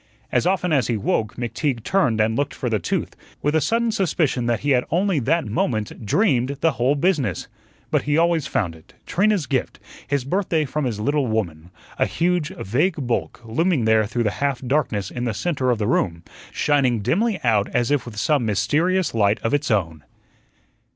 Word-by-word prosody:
As - - +2
often 180 -2 +1
as 130 -7 +2
he 115 - 0
woke, 105 +1 -1
McTeague 120 0 -2
turned 150 - +1
and 110 +1 +2
looked 145 +3 -1
for 125 - -3
the 110 - +1
tooth, 85 - -2 0.3
with 145 - +1
a 160 - +3
sudden 230 - +1
suspicion 155 - 0
that 115 -3 0
he 145 - 0
had 125 -2 +3
only 180 0 +1
that 160 +5 +1
moment 110 0 -2
dreamed 140 - +2
the 165 - +4
whole 125 +3 +1
business. 145 - 0 0.4
But - - +2
he 145 +1 0
always 165 -3 +2
found 90 -6 -1
it 80 - -19
Trina's 200 -3 +1
gift, 130 -1 -2 0.3
his 140 -3 -1
birthday 165 -1 0
from 150 +2 -2
his 115 -4 -2
little 145 +4 0
woman 90 -7 -3 0.3
a - - +3
huge, 170 -2 0
vague 155 - -1
bulk, 120 0 -2
looming 145 +3 +1
there 110 -1 +3
through 120 +2 -1
the 105 - +1
half 140 -3 +1
darkness 125 -8 -1
in 120 0 -4
the 115 -3 -2
centre 135 - -1
of 120 - +2
the 105 - -1
room, 85 -7 0 0.3
shining 130 -6 +1
dimly 195 - +1
out 110 -4 +2
as 120 +1 0
if 145 -4 +2
with 110 -3 -9
some 145 +3 +2
mysterious 150 - +1
light 105 -2 +2
of 115 - 0
its 145 0 0
own. 85 -8 0
130 Hz, 190 wpm, -22 LUFS, 110-160 Hz, 0.4 s, the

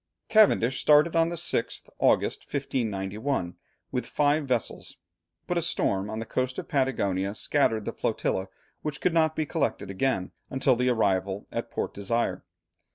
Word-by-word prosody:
Cavendish 200 - +4
started 150 +3 +5
on 165 0 +4
the 170 - -3
6th 160 -8 -1
August, - - +2
1591, 110 -5 -2 0.4
with - - -2
five 145 0 +1
vessels, 125 -4 -2 0.5
but - - 0
a - - -2
storm 95 +1 0
on 110 - -4
the 115 - -4
coast 130 +2 -2
of - - -5
Patagonia 100 -8 0
scattered 110 -5 +1
the - - -3
flotilla, 95 +1 -1 0.3
which 150 -1 -4
could 180 - +1
not 160 -1 +3
be 155 - 0
collected 140 - -2
again 95 -3 -1 0.2
until 130 -1 +2
the 125 +1 +1
arrival 100 -4 +1
at - - -4
Port - - -3
Desire. 115 +4 -1
125 Hz, 155 wpm, -27 LUFS, 100-150 Hz, 0.5 s, started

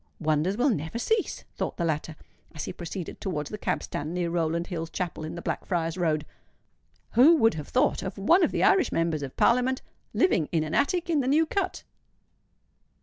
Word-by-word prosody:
"Wonders 155 +5 +1
will 260 +3 +3
never 160 +1 -3
cease!" 435 - -1
thought - - -3
the 170 - 0
latter, 155 0 -2 0.4
as 155 - -4
he - - -5
proceeded 175 0 -7
towards 150 -7 -3
the 210 - -4
cab - - -1
stand 155 +4 -4
near 175 -1 -1
Rowland 170 0 0
Hill's 165 -3 -4
chapel 175 -4 -4
in 155 - -5
the 170 - -7
Blackfriars 165 -2 -2
Road: 155 -4 0 0.9
"who 275 +9 +7
would 225 -7 +4
have 150 -2 -6
thought - - +1
of 190 - -5
one 335 - +4
of - - +4
the - - 0
Irish 385 -3 +4
Members 165 -2 0
of 135 -2 -7
Parliament 250 +2 +3 0.3
living 185 - +2
in 160 -2 +1
an 155 0 -5
attic 350 +4 +1
in 325 -3 +2
the 260 - -1
New 305 +4 +4
Cut?" 395 +5 -2
175 Hz, 195 wpm, -27 LUFS, 160-250 Hz, 0.9 s, who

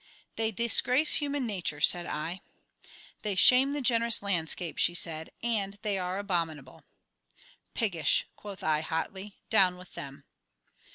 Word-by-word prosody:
"They 220 0 -1
disgrace 245 +6 +4
human 285 -2 -2
nature," 185 -9 -4
said 175 +3 +4
I. 165 +5 -4 0.8
"They 210 -2 -3
shame 255 +8 +6
the 290 - -3
generous 235 -3 +2
landscape," 175 -3 -2
she 175 - +2
said, 160 -2 -4
"and 205 -4 -2
they 210 -2 -1
are 180 +1 -3
abominable." 165 -9 -4 0.9
"Piggish!" 175 - +1
quoth 200 -2 -10
I, 155 -1 +1
hotly. 190 +5 -5
"Down 185 -5 +4
with 180 0 -15
them!" 140 0 -9
195 Hz, 130 wpm, -29 LUFS, 165-225 Hz, 0.9 s, shame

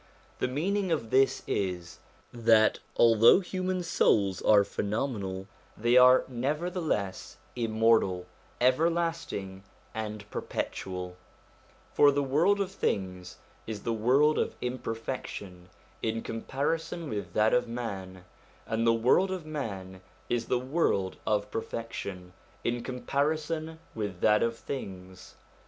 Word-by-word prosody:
The - - +1
meaning 185 +8 -1
of 115 -9 -1
this 135 0 +3
is, 90 -3 -3 0.3
that 115 -2 +4 0.2
although 115 - +7
human 185 -1 -2
souls 100 - +2
are 105 -1 +6
phenomenal, 100 -3 -3 0.3
they 120 +2 +2
are 125 0 +7
nevertheless 145 - -2 0.2
immortal, 110 -5 +2 0.3
everlast 165 +6 +1
ing, 95 -1 -6 0.3
and 105 -2 -5
perpetual; 90 -1 -4 0.8
for 145 - +6
the 140 0 0
world 165 +10 +3
of 195 -1 -1
things 90 - -3 0.3
is 110 -2 -5
the 115 - -1
world 135 +7 +3
of - - -1
imperfection 115 -7 -5 0.3
in 115 0 -2
comparison 160 +8 -3
with 100 -8 -5
that 110 +1 +3
of 125 - +2
man, 95 -6 -6 0.4
and 115 +1 0
the 115 - +6
world 125 +12 +3
of 185 -4 -4
man 95 -11 -5 0.3
is 120 -1 -1
the 125 - +2
world 125 - 0
of 105 -1 0
perfection 100 -6 -5 0.3
in 120 0 -1
com 125 +1 -6
parison 155 +2 -1 0.2
with 100 -5 -4
that 105 0 +4
of 115 0 0
things. 95 -10 -8
115 Hz, 120 wpm, -29 LUFS, 100-145 Hz, 0.8 s, although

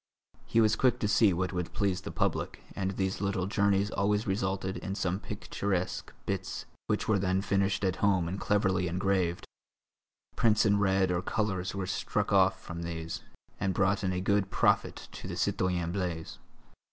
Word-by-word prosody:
He 115 - +2
was 110 -1 +4
quick 125 +1 +3
to 105 - +2
see 105 0 +5
what 90 +2 -1
would 90 -1 -3
please 95 -2 0
the - - -6
public - - -1
and 95 -1 -1
these 95 0 -2
little 100 -2 0
journeys 100 0 +2
always 105 +2 +1
resulted 95 -1 -1
in 95 -1 -4
some 95 -1 -1
picturesque 95 -3 -3
bits - - -3 0.2
which - - 0
were 110 -2 +3
then 95 0 +1
finished 100 0 +1
at 95 -1 +1
home 95 -4 +2
and 95 +3 -3
cleverly 95 -3 +1
engraved; 90 -1 0 0.9
prints 110 -2 +3
in 100 -1 +4
red 95 -2 +3
or 90 0 0
colours 95 -2 -1
were 95 -1 -2
struck 95 - -1
off - - +4
from 85 -1 -7
these, 80 -1 -4 0.4
and 95 -1 0
brought 100 0 +2
in 95 - +1
a 90 0 -1
good 100 0 +1
profit - - +1
to - - -8
the - - -5
citoyen 90 -2 0
Blaise. 90 -4 -3
95 Hz, 175 wpm, -30 LUFS, 90-100 Hz, 0.9 s, see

